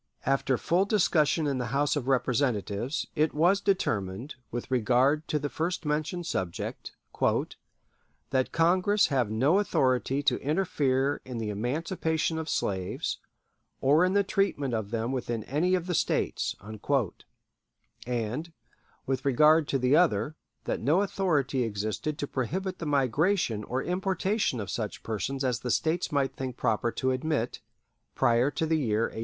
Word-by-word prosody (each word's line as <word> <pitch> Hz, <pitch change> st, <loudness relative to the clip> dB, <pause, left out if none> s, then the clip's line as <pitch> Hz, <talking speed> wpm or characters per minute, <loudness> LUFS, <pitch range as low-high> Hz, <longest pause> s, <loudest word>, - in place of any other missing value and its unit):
After 135 Hz, -1 st, +1 dB
full 175 Hz, +8 st, +2 dB
discussion 165 Hz, -6 st, +2 dB
in 140 Hz, -3 st, 0 dB
the 125 Hz, -, -2 dB
House 145 Hz, +1 st, +2 dB
of 135 Hz, -4 st, -3 dB
Representatives, 125 Hz, -2 st, 0 dB
it 155 Hz, 0 st, +1 dB
was 175 Hz, +6 st, +3 dB
determined, 115 Hz, -, -1 dB, 0.2 s
with 120 Hz, +2 st, -5 dB
regard 130 Hz, +5 st, +2 dB
to 150 Hz, -, 0 dB
the 145 Hz, 0 st, -2 dB
first 165 Hz, +4 st, -3 dB
mentioned 155 Hz, +4 st, -1 dB
subject, 95 Hz, -, -4 dB, 1.4 s
"that 130 Hz, -1 st, +1 dB
Congress 185 Hz, +5 st, +3 dB
have 130 Hz, -7 st, +1 dB
no 135 Hz, -, +3 dB
authority 135 Hz, -6 st, +1 dB
to 140 Hz, -4 st, +2 dB
interfere 145 Hz, -4 st, +1 dB
in 125 Hz, -2 st, -6 dB
the 110 Hz, -2 st, -2 dB
emancipation 160 Hz, -, -1 dB
of 160 Hz, -1 st, -5 dB
slaves, 95 Hz, -7 st, -2 dB, 0.6 s
or 145 Hz, +5 st, +4 dB
in 185 Hz, +1 st, +2 dB
the 200 Hz, 0 st, +4 dB
treatment 190 Hz, -10 st, 0 dB
of 110 Hz, -3 st, -2 dB
them 115 Hz, +2 st, -2 dB
within 120 Hz, -4 st, -2 dB
any 170 Hz, -, +1 dB
of 180 Hz, -2 st, -2 dB
the 180 Hz, -, -2 dB
States"; -, -, 0 dB, 1.5 s
and, 125 Hz, +7 st, -2 dB, 0.5 s
with 130 Hz, 0 st, -1 dB
regard 150 Hz, +3 st, +5 dB
to 135 Hz, -, +1 dB
the 130 Hz, +2 st, +3 dB
other, 155 Hz, -, +2 dB, 0.3 s
that -, -, -2 dB
no 155 Hz, -, +3 dB
authority 155 Hz, -10 st, 0 dB
existed 110 Hz, +7 st, -3 dB
to 145 Hz, -, -2 dB
prohibit 185 Hz, -, -3 dB
the 165 Hz, -, -4 dB
migration 140 Hz, -, +1 dB
or 130 Hz, +2 st, -2 dB
importation 190 Hz, -, 0 dB
of 100 Hz, -, -4 dB
such 110 Hz, -3 st, -4 dB
persons 130 Hz, +5 st, -3 dB
as 125 Hz, -3 st, 0 dB
the 125 Hz, -, -5 dB
States 160 Hz, +7 st, 0 dB
might 140 Hz, -2 st, 0 dB
think 130 Hz, -2 st, -5 dB
proper 115 Hz, +1 st, 0 dB
to 130 Hz, +2 st, 0 dB
admit 130 Hz, -2 st, -1 dB, 0.5 s
"prior 120 Hz, +3 st, +3 dB
to 160 Hz, -, -2 dB
the 160 Hz, 0 st, +1 dB
year 110 Hz, -6 st, +1 dB
1808." -, -, -3 dB
140 Hz, 150 wpm, -28 LUFS, 120-165 Hz, 1.5 s, regard